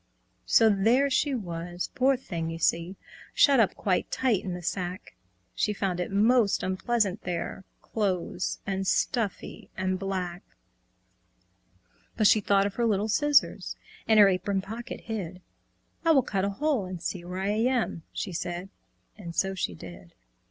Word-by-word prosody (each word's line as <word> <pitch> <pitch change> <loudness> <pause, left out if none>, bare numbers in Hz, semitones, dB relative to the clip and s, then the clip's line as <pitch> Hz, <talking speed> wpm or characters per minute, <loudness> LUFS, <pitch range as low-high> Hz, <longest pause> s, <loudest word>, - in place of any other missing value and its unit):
So 225 - +6
there 230 +7 +3
she 280 +1 +2
was, 175 -4 -5
poor 265 +1 +3
thing, 170 -9 -4
you 165 - -5
see, 170 +3 0 0.4
Shut 275 -3 +6
up 220 - +3
quite 185 -3 0
tight 240 -7 +1
in 185 -2 -4
the 180 - -8
sack; 180 +2 -4 0.4
She 210 - 0
found 190 -3 -2
it 180 - -2
most 215 +2 +3
unpleasant 200 +1 0
there, 180 +2 -4 0.2
Close 185 -4 -2
and 195 -1 -2
stuffy 225 -1 -1
and 185 0 -1
black. 185 -2 -3 1.8
But 215 - +2
she 215 +1 +6
thought 195 0 +3
of 200 - -2
her 235 - +2
little 210 0 +1
scissors, 295 +5 +2 0.3
In 220 - +5
her 205 -1 +9
apron 195 +1 0
pocket 225 +5 -7
hid. 195 -6 -5 0.6
"I 330 - +2
will 270 -4 +4
cut 195 -3 -1
a - - 0
hole 265 0 0
and 180 -1 -6
see 175 +1 -4
where 180 +1 -6
I 190 +1 -1
am," 225 -3 0
She 190 - -4
said. 175 +3 -4 0.5
And 170 -4 -8
so 195 0 +1
she 130 - -3
did. 85 0 -12
195 Hz, 160 wpm, -27 LUFS, 180-225 Hz, 1.8 s, her